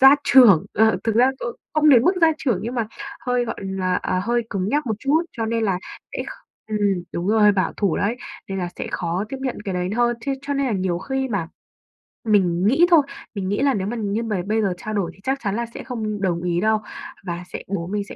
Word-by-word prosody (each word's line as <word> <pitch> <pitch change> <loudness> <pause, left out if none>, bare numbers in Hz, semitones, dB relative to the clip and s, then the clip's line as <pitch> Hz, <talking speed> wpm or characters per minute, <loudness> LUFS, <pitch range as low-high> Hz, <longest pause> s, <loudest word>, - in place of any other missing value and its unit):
gia 270 +2 +9
trưởng, 230 - +7
ờ, 220 +2 +4
thực 225 -2 +1
ra 250 +3 +5
c - - -16 0.4
không 305 0 +4
đến 245 -5 +7
mức 360 - +4
gia 325 -1 +6
trưởng, 245 -8 0
nhưng 235 +3 -4
mà 230 -3 0 0.4
hơi, 250 -1 +1
gọi 230 - -4
là, 190 -1 -1
à, 185 - 0
hơi 240 0 +1
cứng 195 -1 -1
nhắc 295 +2 0
một 220 - 0
chút, 290 +6 +2
cho 225 -1 -1
nên 225 0 0
là 190 -3 +1 0.3
sẽ - - -3
kh - - -8 0.4
ừm, 215 -1 -1 0.3
đúng 170 +2 -3
rồi, 210 -1 +5
bảo 190 -2 0
thủ 200 -6 +1
đấy, 220 +5 0 0.3
nên 195 - -3
là 180 -1 -2
sẽ - - -4
khó 175 +3 -2
tiếp 270 - -5
nhận 260 -2 -3
cái 190 -2 -3
đấy 180 +1 -1
hơn. 240 -1 +2
Ch - - -5
cho 285 0 -2
nên 275 -1 +1
là 240 - 0
nhiều 185 -3 0
khi 265 +7 -2
mà 190 -7 -2 0.8
mình 190 -3 +3
nghĩ 285 +9 +5
thôi, 325 -3 +8 0.3
mình 190 -1 -2
nghĩ 205 - 0
là 275 -1 +3
nếu 195 -1 -2
mà 240 - -3
như 215 +1 -1
mà 210 -5 -1
bây 220 +2 +1
giờ 195 -4 +1
trao 215 +4 -5
đổi 195 -5 -1
thì - - -22
chắc 270 +1 -1
chắn 200 0 -1
là 235 0 -1
sẽ - - -7
không 215 -5 -4
đồng 175 -3 0
ý 175 -1 0
đâu 220 +1 +2 0.4
và 175 -1 -4
sẽ - - -5
bố 180 -3 -3
mình 205 +1 -2
sẽ - - -8
215 Hz, 255 wpm, -22 LUFS, 190-245 Hz, 0.8 s, gia